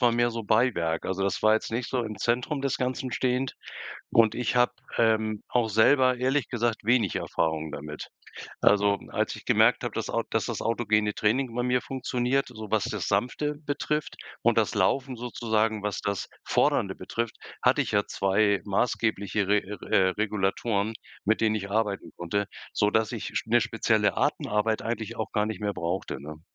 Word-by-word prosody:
war 120 -2 +5
mehr 120 0 +2
so 115 -1 -4
Beiwerk. 105 -8 +1
Also, 95 +1 -2
das 100 - -1
war 110 - +5
jetzt 110 - 0
nicht 120 +2 -3
so 125 -2 0
im 110 -2 -5
Zentrum 125 +7 -1
des 140 - 0
Ganzen 130 0 -2
stehend 130 +1 0 0.6
und 110 -1 +4
ich 125 0 -1
habe, 125 0 +4 0.3
ähm, 110 -2 +2
auch 120 -2 +1
selber 130 +4 +4
ehrlich 130 +3 +1
gesagt 120 -2 -1
wenig 115 -4 +2
Erfahrungen 80 -1 -1
damit. 75 +1 -7 0.5
Also, 100 -1 +4
als - - -1
ich - - -12
gemerkt - - +4
habe, - - -3
dass - - -3
au - - 0
dass - - 0
das - - -3
autogene 105 -2 +1
Training 120 +5 0
bei 120 - -1
mir 125 0 +1
funktioniert, 130 0 -1
so 110 -4 -9
was 110 -2 +2
das 95 -6 -3
Sanfte 125 - 0
betrifft, 150 +1 -2 0.3
und - - +3
das - - +2
Laufen 135 -1 +1
sozusagen, 110 -3 -1
was 105 -1 -2
das 100 -1 -2 0.2
Fordernde - - +1
betrifft, 115 -1 -4 0.3
hatte - - +4
ich - - -5
ja 100 0 +2
2 100 +1 +2
maßgebliche 105 -1 0
Re 105 +1 +4 0.3
äh, 95 - +5
Regulatoren, 105 +1 0 0.3
mit 110 +2 +2
denen 110 -1 +3
ich 100 -2 -4
arbeiten 105 -1 -1
konnte, 100 +4 -1 0.3
so 105 - +2
dass 110 0 +1
ich - - -5
sp - - -3
'ne - - +6
spezielle - - +1
Atemarbeit 105 +1 +1
eigentlich 115 -1 -4
auch 110 - -3
gar 105 0 +1
nicht 110 -2 -5
mehr 100 -1 -1
brauchte, 85 -3 -3
ne? 75 +2 -9
110 Hz, 180 wpm, -27 LUFS, 100-120 Hz, 0.6 s, ne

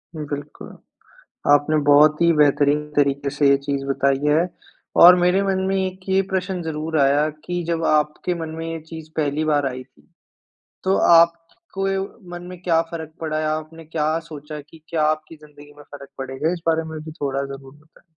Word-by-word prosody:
उम, 150 -1 -5
बिल्कुल। 145 +1 -7 0.8
आपने 145 +2 +4
बहुत 150 +2 +6
ही 170 0 +5
बेहतरीन 150 0 +3
तरीके 140 -1 +1
से 145 0 +2
ये 140 - +5
चीज़ 140 0 -3
बताई 135 0 +1
है। 165 +4 +3 0.5
और 180 +1 +10
मेरे 180 +2 +2
मन 190 -1 0
में 195 - 0
एक 185 0 -6
ये 190 0 +3
प्रश्न 185 -1 -2
ज़रूर 160 0 -3
आया 140 +2 +3 0.2
कि 175 0 -2
जब 165 0 -2
आपके 150 +4 +1
मन 160 - -4
में 165 - -4
ये 165 - -5
चीज़ 160 -1 -9
पहली 150 0 0
बार 145 -2 +1
आई 130 0 -6
थी, 75 - -28 0.8
तो 190 +1 +2
आप 170 0 +6 0.4
को 195 0 -1
य 195 0 0 0.3
मन 175 0 -7
में 180 -1 -10
क्या 165 -2 +3
फ़र्क 160 -2 -7
पड़ा 155 -1 -2
है? 155 - -1
आपने 155 +1 -4
क्या 155 0 -1
सोचा 150 -1 -9
कि 155 +2 -18
क्या 160 -2 -1
आपकी 155 +1 -2
ज़िंदगी 145 -1 -16
में 145 - -13
फ़र्क 140 -1 -12
पड़ेगा? 135 +5 -2
इस 175 - -5
बारे 165 0 +2
में 160 - -6
भी 155 - -8
थोड़ा 140 -1 -1
ज़रूर 135 0 -10
बताएँ। 155 +2 -24
155 Hz, 195 wpm, -21 LUFS, 145-165 Hz, 0.8 s, और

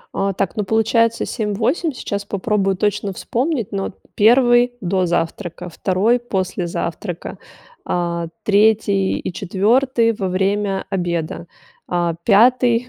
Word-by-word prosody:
А, 195 0 0
так, 190 -1 -2
ну, 210 - -1
получается 225 +2 +2
7, 210 -3 -3
8. 265 - 0
Сейчас 200 -6 -4
попробую 200 -1 0
точно 205 0 -1
вспомнить, 245 - -2
ну, 195 -1 -2
вот, - - -7 0.2
1 240 +2 +5
до 185 -1 0
завтрака, 175 +1 -3
2 195 +8 +1
после 185 -6 -2
завтрака, 170 +1 -5 0.4
а, 170 -1 -2 0.2
3 205 -2 +2
и - - -5
4- 230 +6 +2
во 195 -3 -3
время 195 +1 0
обеда, 170 -3 -2 0.4
а, 175 -1 0
5- 240 +2 +4
200 Hz, 125 wpm, -19 LUFS, 185-230 Hz, 0.4 s, 1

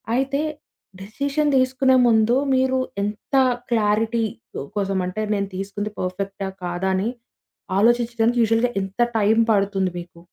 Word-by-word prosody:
అయితే 270 +2 0 0.6
డెసిషన్ 280 +8 -1
దీసుకునే 260 0 +3
ముందు 225 +1 +4 0.2
మీరు 260 0 +2 0.2
ఎంత 210 +6 -4 0.4
క్లారిటీ 225 +1 +1 0.5
కోసం 195 -2 -1
అంటే 200 +4 -4
నేను 200 -1 -1
తీసుకుంది 200 +2 -4
పర్ఫెక్టా 195 +1 -4 0.2
కాదా 175 +2 -2
అని 195 +5 0 0.7
ఆలోచించడానికి 235 +1 +2
యూషువల్‌గా 230 +2 +2
ఎంత 195 +4 -7 0.2
టైం 215 +1 +3
పడుతుంది 195 -2 +1
మీకు? 170 -1 -12
215 Hz, 115 wpm, -22 LUFS, 195-240 Hz, 0.7 s, ముందు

